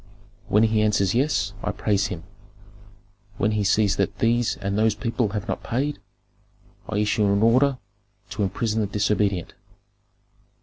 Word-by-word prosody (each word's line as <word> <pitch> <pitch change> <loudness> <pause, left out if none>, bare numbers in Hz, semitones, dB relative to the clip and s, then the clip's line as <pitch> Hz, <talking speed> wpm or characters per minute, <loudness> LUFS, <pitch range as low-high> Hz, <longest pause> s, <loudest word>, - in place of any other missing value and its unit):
When 105 +2 +3
he 110 -1 +2
answers 105 -3 +2
yes, 140 +6 0
I - - -2
praise 100 -1 0
him; 85 -5 -6 1.1
when 105 +2 +1
he 105 -1 0
says 100 0 +2
that 100 - -1
these 120 0 +1
and 100 0 -3
those 110 0 +2
people 115 +1 -1
have 105 +2 -4
not - - -3
paid, 140 +5 -2 0.9
I 105 - -2
issue 105 0 +1
an 100 +1 +2
order 130 +4 +4 0.5
to - - -4
imprison 110 +3 -1
the 105 - 0
disobedient. 100 -3 0
105 Hz, 145 wpm, -24 LUFS, 100-115 Hz, 1.1 s, order